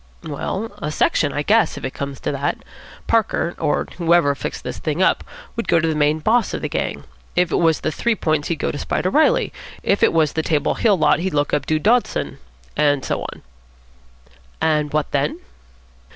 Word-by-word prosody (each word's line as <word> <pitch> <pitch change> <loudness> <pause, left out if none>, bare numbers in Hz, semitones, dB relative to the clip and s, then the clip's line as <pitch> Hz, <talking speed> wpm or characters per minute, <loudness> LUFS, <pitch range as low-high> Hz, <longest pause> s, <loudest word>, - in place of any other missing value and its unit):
"Well, 190 +8 -4
a 150 - -3
section, 150 -1 +2
I 145 - -2
guess, 220 +7 +3
if - - -5
it 130 - -4
comes 140 -1 -5
to - - -1
that. 140 0 -1 0.5
Parker, 215 -6 +1
or 145 - 0
whoever 170 -4 +4
fixed 140 - -5
this - - -5
thing 155 +1 -2
up, 190 - +3 0.3
would 230 - -3
go 170 - +4
to 165 - +1
the 160 - +1
main 150 0 +2
boss 225 +9 +1
of - - -6
the - - 0
gang. - - -3 0.3
If 180 -1 +2
it - - +2
was 165 -2 +2
the 155 - -1
Three 235 +8 0
Points, 155 -6 0
he'd 170 - 0
go - - -2
to 145 - -6
Spider 185 - -1
Reilly. 310 +7 +3 0.3
If 200 - +1
it - - +5
was 160 -3 +2
the 160 - 0
Table 155 -2 +1
Hill 210 -4 +2
lot, 160 - +3
he'd 180 -2 -2
look 145 0 0
up 140 - 0
Dude 155 -1 0
Dawson. 75 - +1 0.4
And 145 -2 +2
so - - -1
on." - - -13 1.2
"And 150 -2 +1
what 155 -1 -1
then?" 145 +1 0
155 Hz, 205 wpm, -21 LUFS, 145-180 Hz, 1.2 s, it